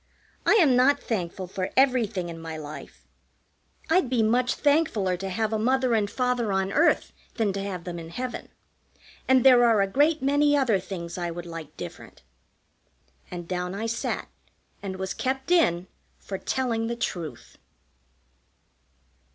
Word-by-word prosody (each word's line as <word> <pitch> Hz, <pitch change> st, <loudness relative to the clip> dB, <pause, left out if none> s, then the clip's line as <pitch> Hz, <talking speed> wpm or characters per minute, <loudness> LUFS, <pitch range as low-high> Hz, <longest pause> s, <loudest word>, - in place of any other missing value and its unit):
"I -, -, +6 dB
am 310 Hz, -, +5 dB
not 275 Hz, +3 st, +4 dB
thankful 185 Hz, -4 st, -3 dB
for 185 Hz, +1 st, -4 dB
everything 230 Hz, -9 st, +2 dB
in 165 Hz, -1 st, -7 dB
my 165 Hz, -1 st, -6 dB
life. 150 Hz, 0 st, -10 dB, 0.8 s
I'd 325 Hz, -5 st, +2 dB
be 245 Hz, -3 st, +2 dB
much 245 Hz, +3 st, +2 dB
thankfuller 285 Hz, -, +2 dB
to 195 Hz, -, -4 dB
have 220 Hz, +3 st, -1 dB
a 220 Hz, -, 0 dB
Mother 255 Hz, +2 st, +2 dB
and 210 Hz, -3 st, +1 dB
Father 250 Hz, -3 st, 0 dB
on 190 Hz, 0 st, 0 dB
earth 330 Hz, +3 st, +2 dB, 0.2 s
than 215 Hz, -4 st, 0 dB
to 195 Hz, -, -3 dB
have 190 Hz, -3 st, -5 dB
them 175 Hz, -1 st, -6 dB
in 165 Hz, 0 st, -9 dB
heaven. 250 Hz, +8 st, -5 dB, 0.8 s
And 260 Hz, -1 st, +5 dB
there 250 Hz, -2 st, +7 dB
are 230 Hz, -3 st, +4 dB
a 195 Hz, -, +4 dB
great 295 Hz, +8 st, +2 dB
many 290 Hz, +1 st, +3 dB
other 240 Hz, -8 st, +2 dB
things 180 Hz, -2 st, -6 dB
I 175 Hz, -1 st, -2 dB
would 170 Hz, +1 st, -6 dB
like 165 Hz, -3 st, -9 dB
different." 85 Hz, -6 st, -9 dB, 1.1 s
And 175 Hz, -1 st, -7 dB
down 180 Hz, +1 st, -3 dB
I 220 Hz, +3 st, -3 dB
sat, 230 Hz, 0 st, -2 dB, 0.5 s
and 195 Hz, -2 st, -5 dB
was 190 Hz, 0 st, -4 dB
kept 265 Hz, +4 st, -3 dB
in 185 Hz, -, +3 dB, 0.3 s
for 195 Hz, -1 st, -6 dB
telling 235 Hz, -4 st, -1 dB
the 235 Hz, -, -2 dB
truth. 165 Hz, -, -5 dB
220 Hz, 160 wpm, -26 LUFS, 180-255 Hz, 1.1 s, there